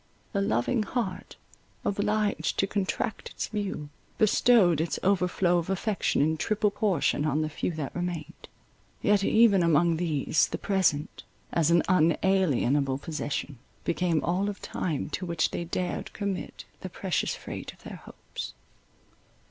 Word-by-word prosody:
The 200 - +1
loving 160 - +1
heart, 210 -3 -3 0.5
obliged 210 +1 0
to - - +3
contract 200 +2 -2
its - - -5
view, 200 -8 -3 0.3
bestowed 210 -6 +4
its 165 - -1
overflow 180 -2 +2
of 170 - -5
affection 195 -4 +1
in 160 +1 +1
triple 210 +4 +1
portion 190 -9 +1
on 155 0 +1
the 155 - -2
few 150 - -2
that 155 -4 -5
remained. 175 -3 -5 0.5
Yet, 205 -2 +3
even 215 -3 +5
among 165 0 +3
these, 155 -3 +1
the - - -4
present, 175 -7 0 0.3
as 165 -2 +2
an 170 0 +4
unalienable 155 -6 +2
possession, 145 -3 -4 0.2
became 170 -2 0
all 185 +4 0
of 200 - -6
time 155 -3 -3
to 185 - -3
which 170 -2 0
they 170 - -3
dared 180 +1 -3
commit 200 -3 -4
the - - -6
precious - - -1
freight - - -7
of - - -22
their - - -8
hopes. - - -9
180 Hz, 140 wpm, -28 LUFS, 155-200 Hz, 0.5 s, even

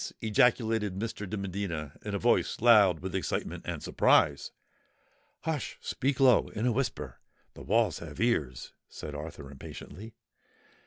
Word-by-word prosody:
ejaculated 110 -2 +2
Mr. 105 -1 -4
de 105 - -3
Medina, 95 -6 -4
in - - -3
a - - +1
voice - - +1
loud 105 -5 +6
with 95 0 -5
excitement 95 - -3
and - - -4
surprise. 70 -1 +3 0.9
"Hush! 160 -3 -3
speak 135 +1 -2
low—in 125 -4 +3
a 125 - +3
whisper—the 120 -1 -5
walls 110 -2 +1
have 80 -3 -9
ears!" 75 - -1 0.2
said 75 - -8
Arthur 75 -2 -8
impatiently. 105 - -10
105 Hz, 125 wpm, -29 LUFS, 85-115 Hz, 0.9 s, loud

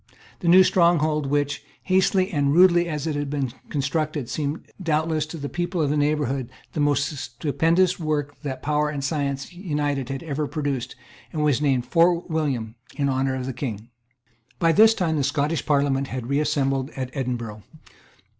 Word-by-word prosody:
The 175 - -4
new 185 +2 +8
stronghold, 155 -5 +2
which, 145 0 -1 0.2
hastily 190 +1 +2
and 145 -4 +1
rudely 175 -1 +5
as 150 -2 -3
it 155 -2 -1
had 145 -1 -2
been 135 -4 -2 0.2
constructed, 150 -1 -2
seemed 150 +1 -3 0.2
doubtless 160 -2 0
to 165 - -7
the 145 -2 -4
people 175 +3 -3
of 145 -3 +1
the - - +1
neighbourhood 145 -4 0 0.2
the - - -3
most 145 +1 +1
stupendous 160 +8 +1
work 150 -3 -2
that 130 -3 -5
power 150 0 +1
and 145 -2 -4
science 140 0 -2
united 145 -7 -2
had 135 +2 -4
ever 150 -2 -2
produced, 140 -6 -3 0.4
was 150 -3 +1
named 135 -4 +1
Fort 170 +4 +2
William 135 -9 -1 0.2
in 140 -1 0
honour 130 0 0
of 130 -1 -4
the 130 - -3
King, 115 -4 -5 0.7
By 165 -1 +3
this 220 +7 +6
time 165 -6 0
the 145 - +1
Scottish 145 +3 -1
Parliament 140 -2 +2
had 130 -3 -5
reassembled 140 -2 +1
at 130 -1 -3
Edinburgh. 120 -6 -4
145 Hz, 165 wpm, -24 LUFS, 135-160 Hz, 0.7 s, new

